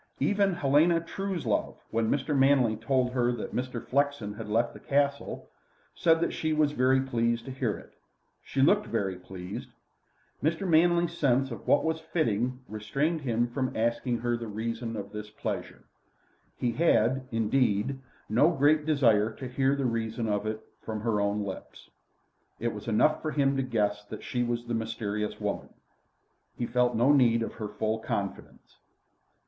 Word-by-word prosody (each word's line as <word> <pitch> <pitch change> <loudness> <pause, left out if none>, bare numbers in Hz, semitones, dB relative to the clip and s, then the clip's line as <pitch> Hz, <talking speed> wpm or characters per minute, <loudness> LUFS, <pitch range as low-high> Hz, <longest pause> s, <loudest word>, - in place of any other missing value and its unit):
Even 200 -2 +2
Helena 165 +2 +4
Truslove, 170 - -2
when 115 -1 +1
Mr. 145 +1 0
Manley 135 -4 +4
told 125 +3 0
her 125 -1 +1
that 120 - -5
Mr. 125 -1 -3
Flexen 140 -6 0
had 110 0 -8
left 115 +3 +1
the - - -11
Castle, 140 0 -1 0.5
said 165 -1 +3
that - - 0
she 155 0 -1
was 155 -1 +3
very 130 -1 +3
pleased 120 -3 0
to 135 - -6
hear 130 -5 -1
it. - - -15 0.5
She 135 - 0
looked 200 - +4
very 100 -4 -1
pleased. 90 +1 -8 0.7
Mr. 165 +6 0
Manley's 170 +1 +3
sense 135 -3 +2
of 115 - -8
what - - +4
was 160 0 0
fitting 130 -6 -1
restrained 140 +10 -1
him 120 -3 +1
from 130 +1 -3
asking 120 +2 0
her 120 0 +1
the 120 -1 -5
reason 115 +2 -4
of 100 0 -6
this 105 0 -7
pleasure. 105 - -5 0.7
He 120 - 0
had, 130 -3 +2
indeed, 115 +2 +1 0.3
no 125 +9 +4
great 150 -1 +3
desire 115 -8 +3
to 130 - -7
hear 135 +2 +1
the 140 -1 -1
reason 115 -1 -1
of 105 0 -1
it 110 0 -4 0.2
from 110 -1 -5
her 110 -2 +1
own 100 +1 0
lips. 95 -2 -8 0.7
It 115 0 -1
was 105 +1 -8
enough 115 +7 +3
for 155 - -2
him 140 -2 +2
to 135 - +1
guess 105 -5 0
that - - -8
she 125 - -2
was 120 0 -1
the 120 - -3
mysterious 110 -2 -3
woman. - - -3 0.9
He 120 - -1
felt 125 0 +1
no 120 +5 +4
need 120 -5 +4
of - - -5
her 105 - -2
full 110 +1 -2
confidence. 100 -3 -5
120 Hz, 165 wpm, -28 LUFS, 110-140 Hz, 0.9 s, Helena